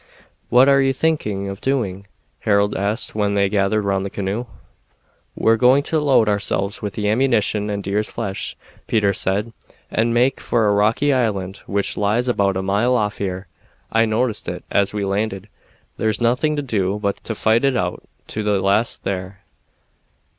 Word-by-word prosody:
"What 125 Hz, +2 st, +6 dB
are 140 Hz, 0 st, +5 dB
you 135 Hz, 0 st, +2 dB
thinking 110 Hz, -10 st, -1 dB
of 100 Hz, 0 st, -6 dB
doing?" 100 Hz, -8 st, -2 dB, 0.3 s
Harold 100 Hz, 0 st, +1 dB
asked 105 Hz, +5 st, -1 dB
when 105 Hz, -1 st, 0 dB
they 100 Hz, 0 st, +3 dB
gathered 100 Hz, +1 st, +1 dB
round 100 Hz, -1 st, 0 dB
the 100 Hz, -, -3 dB
canoe. 100 Hz, +5 st, -3 dB, 0.9 s
"We're 115 Hz, 0 st, +3 dB
going 130 Hz, +5 st, +4 dB
to 160 Hz, +2 st, 0 dB
load 135 Hz, -7 st, +3 dB
ourselves 100 Hz, 0 st, 0 dB
with 105 Hz, -3 st, -4 dB
the 105 Hz, -1 st, -1 dB
ammunition 110 Hz, -3 st, +1 dB
and 100 Hz, -1 st, -3 dB
deer's 105 Hz, +2 st, -1 dB
flesh," 100 Hz, -4 st, -4 dB, 0.3 s
Peter 105 Hz, -3 st, +2 dB
said, 100 Hz, +5 st, -1 dB, 0.4 s
"and 115 Hz, +1 st, +1 dB
make 125 Hz, +3 st, +2 dB
for 115 Hz, -2 st, +1 dB
a 105 Hz, -, +3 dB
rocky 110 Hz, +8 st, +2 dB
island 100 Hz, -6 st, -1 dB
which 100 Hz, 0 st, -1 dB
lies 110 Hz, +5 st, +1 dB
about 100 Hz, -5 st, +1 dB
a 95 Hz, -, -2 dB
mile 105 Hz, +6 st, +2 dB
off 105 Hz, -3 st, -1 dB
here. 95 Hz, -1 st, -3 dB, 0.5 s
I 115 Hz, 0 st, +3 dB
noticed 110 Hz, +1 st, -1 dB
it -, -, -6 dB
as 100 Hz, -1 st, +2 dB
we 105 Hz, -1 st, -2 dB
landed. 100 Hz, 0 st, -2 dB, 0.5 s
There's 110 Hz, -1 st, 0 dB
nothing 125 Hz, +6 st, +1 dB
to 145 Hz, -, -2 dB
do 100 Hz, -6 st, -1 dB
but 100 Hz, -1 st, -1 dB
to 110 Hz, -, -3 dB
fight 110 Hz, +3 st, +2 dB
it 135 Hz, -2 st, +2 dB
out 90 Hz, -3 st, -2 dB, 0.3 s
to 110 Hz, -, -3 dB
the 105 Hz, -2 st, +1 dB
last 100 Hz, +4 st, +1 dB
there. 95 Hz, 0 st, -4 dB
105 Hz, 175 wpm, -20 LUFS, 100-120 Hz, 0.9 s, What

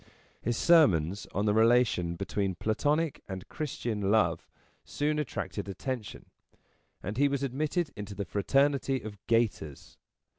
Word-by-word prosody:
His 120 Hz, +1 st, -1 dB
sermons 100 Hz, -, +4 dB
on 100 Hz, +2 st, -1 dB
the 105 Hz, -, +3 dB
relation 110 Hz, -6 st, +3 dB
between 100 Hz, 0 st, -2 dB
Platonic 145 Hz, -, 0 dB
and 95 Hz, -2 st, -7 dB
Christian 115 Hz, -9 st, -3 dB
Love 110 Hz, 0 st, +2 dB, 0.4 s
soon 150 Hz, +1 st, -1 dB
attracted 105 Hz, -7 st, -4 dB
attention, 115 Hz, +3 st, -5 dB, 0.8 s
and 100 Hz, +4 st, -4 dB
he 145 Hz, +1 st, +4 dB
was 140 Hz, -1 st, -1 dB
admitted 150 Hz, +4 st, -1 dB
into 100 Hz, -1 st, -7 dB
the 100 Hz, 0 st, -3 dB
fraternity 135 Hz, -, +1 dB
of 105 Hz, -2 st, -8 dB
gaiters. 115 Hz, -, -1 dB
110 Hz, 125 wpm, -29 LUFS, 100-140 Hz, 0.8 s, sermons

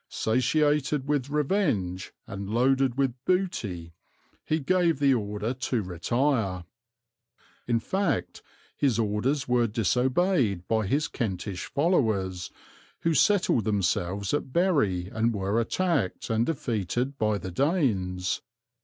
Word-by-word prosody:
Satiated 145 Hz, +4 st, +1 dB
with 145 Hz, -2 st, 0 dB
revenge 140 Hz, -, 0 dB
and 100 Hz, 0 st, -6 dB
loaded 130 Hz, +2 st, +2 dB
with 135 Hz, -3 st, +1 dB
booty, 105 Hz, -, -1 dB, 0.5 s
he 155 Hz, -, 0 dB
gave 170 Hz, +2 st, +2 dB
the 140 Hz, -1 st, +4 dB
order 105 Hz, 0 st, -2 dB
to 125 Hz, -3 st, -2 dB
retire." 95 Hz, -, -1 dB, 1.0 s
In 120 Hz, -1 st, +2 dB
fact 190 Hz, -, -1 dB, 0.3 s
his 130 Hz, -6 st, +1 dB
orders 115 Hz, +6 st, 0 dB
were 120 Hz, -1 st, +3 dB
disobeyed 125 Hz, -, +1 dB
by 110 Hz, -3 st, +1 dB
his 150 Hz, +9 st, +1 dB
Kentish 95 Hz, -, -4 dB
followers, 110 Hz, -, 0 dB, 0.5 s
who 165 Hz, -, +1 dB
settled 175 Hz, -, +3 dB
themselves 100 Hz, -1 st, 0 dB
at 145 Hz, -2 st, -1 dB
Bury 135 Hz, -, +2 dB
and 115 Hz, +2 st, 0 dB
were 100 Hz, +3 st, 0 dB
attacked 145 Hz, -, -1 dB
and 115 Hz, +1 st, +1 dB
defeated 125 Hz, -, -2 dB
by 110 Hz, -1 st, +1 dB
the 95 Hz, -2 st, -6 dB
Danes. 95 Hz, -, 0 dB
120 Hz, 115 wpm, -27 LUFS, 100-145 Hz, 1.0 s, the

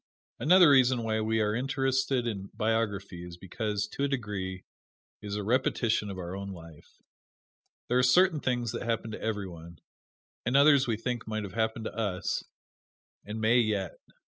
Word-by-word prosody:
Another 175 Hz, +4 st, +6 dB
reason 130 Hz, -3 st, +4 dB
why 110 Hz, -1 st, 0 dB
we 110 Hz, +1 st, +1 dB
are 105 Hz, 0 st, +1 dB
interested 135 Hz, 0 st, 0 dB
in 100 Hz, -4 st, -4 dB
biography 105 Hz, -5 st, -1 dB
is 90 Hz, -1 st, -9 dB
because, 105 Hz, +3 st, -3 dB
to 140 Hz, -, -4 dB
a -, -, +3 dB
degree, 100 Hz, -8 st, -4 dB, 0.6 s
it 105 Hz, -, -8 dB
is 100 Hz, -, -3 dB
a 105 Hz, -, -3 dB
repetition 115 Hz, -2 st, +1 dB
of 95 Hz, -, -6 dB
our 90 Hz, 0 st, -5 dB
own 100 Hz, 0 st, -5 dB
life. 85 Hz, -5 st, -12 dB, 1.0 s
There 125 Hz, +1 st, +2 dB
are -, -, +5 dB
certain 160 Hz, +6 st, +4 dB
things 120 Hz, -4 st, -1 dB
that -, -, -5 dB
happen 115 Hz, -1 st, -2 dB
to -, -, -7 dB
every 105 Hz, -3 st, -2 dB
one, 85 Hz, -1 st, -11 dB, 0.7 s
and 125 Hz, +3 st, +2 dB
others 140 Hz, -2 st, +6 dB
we 115 Hz, -2 st, 0 dB
think 120 Hz, 0 st, -4 dB
might 110 Hz, -1 st, -3 dB
have 95 Hz, -3 st, -7 dB
happened 110 Hz, 0 st, -1 dB
to -, -, -4 dB
us, 100 Hz, -5 st, -2 dB, 0.8 s
and 105 Hz, +2 st, -5 dB
may 110 Hz, +3 st, +4 dB
yet. 105 Hz, -5 st, -1 dB
110 Hz, 175 wpm, -29 LUFS, 100-125 Hz, 1.0 s, Another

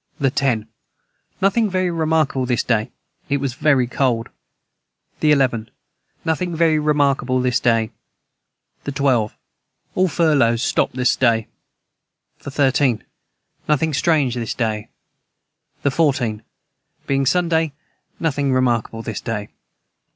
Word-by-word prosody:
the 135 Hz, -2 st, +2 dB
10. 120 Hz, -6 st, 0 dB, 0.8 s
Nothing 210 Hz, +3 st, +3 dB
very 185 Hz, -1 st, 0 dB
remarkable 155 Hz, -5 st, +1 dB
this 125 Hz, -2 st, +1 dB
day 110 Hz, -2 st, 0 dB, 0.4 s
it 140 Hz, -, +2 dB
was 135 Hz, -2 st, -2 dB
very 135 Hz, -2 st, +2 dB
cold. 120 Hz, -2 st, 0 dB, 0.9 s
the 155 Hz, -, +3 dB
11. 125 Hz, -6 st, +1 dB, 0.6 s
Nothing 170 Hz, +2 st, -1 dB
very 160 Hz, -1 st, +3 dB
remarkable 140 Hz, -4 st, +1 dB
this 125 Hz, -1 st, +1 dB
day. 115 Hz, -1 st, +1 dB, 0.9 s
the 140 Hz, -, -3 dB
12. 130 Hz, -6 st, +1 dB, 0.6 s
All 185 Hz, 0 st, +2 dB
furlows 140 Hz, -9 st, +2 dB
stopt -, -, 0 dB
this 125 Hz, -1 st, +2 dB
day. 115 Hz, -4 st, +2 dB, 0.9 s
the -, -, -8 dB
13. 135 Hz, -4 st, +2 dB, 0.7 s
Nothing 155 Hz, +1 st, +2 dB
strange 140 Hz, -4 st, +2 dB
this 120 Hz, -2 st, -3 dB
day. 110 Hz, -3 st, -2 dB, 0.9 s
the 140 Hz, -, +2 dB
14. 130 Hz, -8 st, +1 dB, 0.6 s
Being 135 Hz, -1 st, +1 dB
Sunday 165 Hz, -1 st, +2 dB, 0.5 s
nothing 145 Hz, -4 st, 0 dB
remarkable 120 Hz, -3 st, 0 dB
this 110 Hz, -3 st, -5 dB
day. 105 Hz, -3 st, -4 dB
135 Hz, 115 wpm, -20 LUFS, 120-155 Hz, 0.9 s, Nothing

